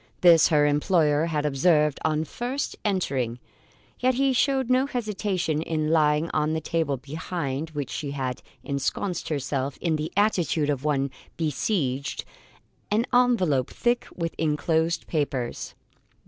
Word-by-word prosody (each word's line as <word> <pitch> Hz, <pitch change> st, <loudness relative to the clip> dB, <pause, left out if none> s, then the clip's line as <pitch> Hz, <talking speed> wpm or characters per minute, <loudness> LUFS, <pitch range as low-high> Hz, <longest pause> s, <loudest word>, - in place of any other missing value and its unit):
This 170 Hz, -3 st, +7 dB
her 150 Hz, -2 st, +4 dB
employer 150 Hz, +1 st, +2 dB
had 150 Hz, -3 st, -1 dB
observed 150 Hz, +1 st, +3 dB
on 155 Hz, 0 st, +1 dB
first 245 Hz, -, -3 dB
entering; 135 Hz, -, -1 dB, 0.6 s
yet 255 Hz, 0 st, +2 dB
he 270 Hz, +1 st, +2 dB
showed 265 Hz, 0 st, +2 dB
no 255 Hz, +2 st, +3 dB
hesitation 200 Hz, -, -1 dB
in 155 Hz, -1 st, -1 dB
laying 150 Hz, 0 st, +3 dB
on 155 Hz, 0 st, +1 dB
the 160 Hz, -, 0 dB
table 160 Hz, -3 st, -1 dB
behind 150 Hz, +1 st, -4 dB
which 145 Hz, -3 st, -5 dB
she 145 Hz, -, -4 dB
had 130 Hz, -3 st, -3 dB, 0.2 s
ensconced 140 Hz, +6 st, -2 dB
herself 140 Hz, -2 st, -2 dB
in 165 Hz, -3 st, 0 dB
the 150 Hz, +1 st, -4 dB
attitude 175 Hz, -7 st, +2 dB
of 135 Hz, -2 st, -3 dB
one 140 Hz, -3 st, 0 dB, 0.3 s
besieged, 140 Hz, -, -1 dB, 0.6 s
an 220 Hz, +3 st, +2 dB
envelope 190 Hz, -, +3 dB
thick 240 Hz, 0 st, 0 dB
with 165 Hz, -2 st, -3 dB
enclosed 160 Hz, +2 st, +1 dB
papers. 140 Hz, -6 st, -2 dB
155 Hz, 135 wpm, -25 LUFS, 145-185 Hz, 0.6 s, This